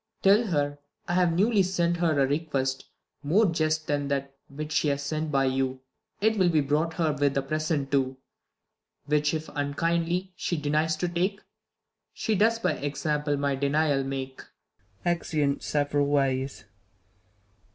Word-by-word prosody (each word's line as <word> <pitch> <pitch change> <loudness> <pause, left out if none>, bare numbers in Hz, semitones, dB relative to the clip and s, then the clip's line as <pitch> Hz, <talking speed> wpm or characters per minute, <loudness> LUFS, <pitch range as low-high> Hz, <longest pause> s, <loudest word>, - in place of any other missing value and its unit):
Tell 205 +4 +5
her, 145 -4 -1 0.3
I've 175 0 +2
newly 205 +4 +3
sent 175 -2 +1
her 165 -4 +1
a 135 - +5
request 135 -2 -1 0.4
More 175 +10 +3
just 155 -3 0
than 145 -1 -1
that 140 -1 -2
which 150 +2 -7
she 155 - +2
has 140 -1 0
sent 155 +2 -2
by 135 -1 +2
you; 130 0 -1 0.4
It 220 0 +2
will 180 -2 +4
be 160 -2 +3
brouglit 150 +3 0
her 160 -3 +1
with 145 -1 +1
a 135 - +1
present 155 -1 -1
too: 135 -2 +1 0.9
Which 150 0 +2
if, 155 0 -4
unkindly, 170 +5 -1
she 175 - -2
denies 155 +2 +1
to 175 +3 -2
take, 185 +4 -1 0.7
She 220 - -1
does 225 +3 +3
by 230 - 0
'xample 145 0 -1
my 140 0 0
denial 140 +1 +1
make. 135 -1 -5 0.6
[Exeunt 155 -5 0
several 145 -1 0
ways. 135 -4 0
150 Hz, 150 wpm, -27 LUFS, 140-170 Hz, 0.9 s, Tell